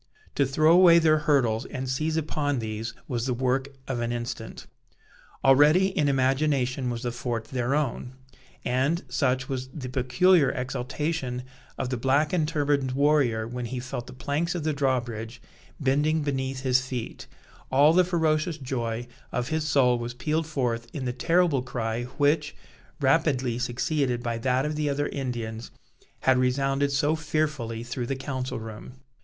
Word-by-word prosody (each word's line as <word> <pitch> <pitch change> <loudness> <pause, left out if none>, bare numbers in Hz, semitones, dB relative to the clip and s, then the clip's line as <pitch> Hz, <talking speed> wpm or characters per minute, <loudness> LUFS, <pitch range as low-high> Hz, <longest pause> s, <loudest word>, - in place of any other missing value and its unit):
To 140 - +2
throw 155 +4 +3
away 175 -1 +8
their 155 -2 +4
hurdles 120 -5 +2
and 130 -1 -5
seize 155 +5 -1
upon 145 -2 -1
these, 110 0 -4
was 120 0 -2
the 125 - 0
work 130 +2 0 0.2
of 130 -3 -2
an 120 0 -1
instant. 120 0 -5 0.8
Already, 150 +8 +6
in 150 -6 +1
imagination, 135 -1 +1
was 120 0 -4
the 120 - -1
fort 120 -2 -3
their 125 +3 -1
own; 130 -3 -2 0.5
and, 135 +8 +1
such, 130 0 0
was 130 -2 -4
the 130 -3 -6
peculiar 140 +6 +3
exaltation 130 +1 -3 0.3
of 125 - -2
the 125 - -1
black 140 +6 +2
and 160 -4 +2
turbaned 145 -4 0
warrior 135 -6 +2
when 125 +1 -5
he 125 +2 -4
felt 125 -1 -6
the - - -9
planks 150 +6 -2
of 170 - -3
the 155 0 0
drawbridge 125 -4 -2 0.4
bending 150 +3 +1
beneath 135 -2 -2
his 130 -1 +3
feet, 130 -3 -6 0.4
all 145 +4 +6
the 185 +1 +5
ferocious 160 -2 0
joy 120 -4 -3 0.3
of 125 +2 -2
his 155 -1 -1
soul 125 -4 +3
was 120 +1 -5
pealed 155 +5 -1
forth 120 -6 -2
in 135 -3 -4
the 125 - -1
terrible 165 0 +2
cry 120 -1 -3
which, 145 +1 +2 0.4
rapidly 135 -4 +2
succeeded 125 0 -1
by 115 -2 -2
that 130 +3 +1
of 150 0 -2
the 150 -1 0
other 145 +1 -1
Indians, 120 -4 -4 0.5
had 130 -1 +4
resounded 135 +2 +1
so 145 +2 +2
fearfully 150 -8 -2
through 120 0 -4
the 135 - -1
council 130 -2 -4
room. 110 +2 -9
130 Hz, 160 wpm, -26 LUFS, 125-150 Hz, 0.8 s, away